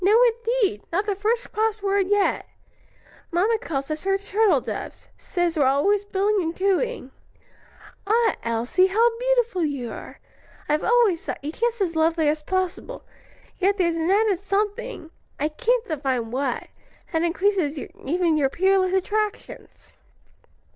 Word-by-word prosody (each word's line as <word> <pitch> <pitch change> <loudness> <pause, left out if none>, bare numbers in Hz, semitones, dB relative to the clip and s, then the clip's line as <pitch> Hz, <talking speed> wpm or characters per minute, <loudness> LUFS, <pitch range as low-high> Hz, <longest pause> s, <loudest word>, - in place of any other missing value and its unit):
"No 420 +5 +5
indeed! 465 - +1
not 390 +5 0
the 415 - 0
first 440 +5 -1
cross 435 -1 -1
word 395 -1 +1
yet. 410 0 +1 0.8
Mamma 415 +6 +1
calls 275 -5 -4
us 305 0 -3
her 390 0 +2
turtle 405 +2 +2
doves: - - -7
says 350 -2 -2
we're 285 -4 +3
always 395 +10 +2
billing 405 +1 +1
and 330 0 -3
cooing. 395 - 0 1.0
Ah, 450 +1 +3
Elsie, 235 +11 +1
how 460 +4 +2
beautiful 485 -7 +1
you 275 -6 -3
are! - - -10 0.5
I've 300 +1 +1
always 455 -8 +3
thought - - -4
you 295 - -3
just 470 +4 -1
as 340 -4 0
lovely 320 0 +2
as 305 +1 +1
possible, 375 +8 -3 0.5
yet 395 +1 +2
there's 340 -3 +1
an 330 +1 -1
added 405 -2 +3
something 410 -1 -3 0.3
I 300 +2 0
can't 470 +9 0
divine 265 -7 -2
what 255 -1 -2 0.4
that 320 - +1
increases 345 -3 +1
even 325 +4 -1
your 275 -3 +2
peerless 380 +3 +2
attractions." 420 +2 -3
380 Hz, 145 wpm, -24 LUFS, 320-430 Hz, 1.0 s, No